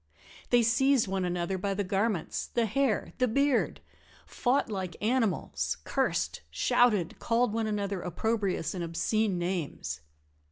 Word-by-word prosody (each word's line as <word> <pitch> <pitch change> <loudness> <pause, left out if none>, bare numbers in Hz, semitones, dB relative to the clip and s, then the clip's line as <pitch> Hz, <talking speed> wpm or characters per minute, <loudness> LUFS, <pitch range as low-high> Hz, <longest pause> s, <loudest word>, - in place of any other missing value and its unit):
They 240 -1 +5
seized 255 +1 +3
one 190 -1 -1
another 180 +1 -1
by 195 +1 -1
the 205 - 0
garments, 195 -2 -1
the 235 -1 0
hair, 230 +1 0
the 255 - +3
beard 275 +3 +1 0.4
fought 260 +3 +1
like 190 -5 -4
animals, 225 -3 0
cursed, - - -1
shouted, 210 -9 +2
called 230 -1 +1
one 225 -1 0
another 200 -3 -2
opprobrious 195 0 -1
and 180 -2 -3
obscene 185 +4 0
names. 165 - -3
205 Hz, 130 wpm, -29 LUFS, 180-235 Hz, 0.4 s, They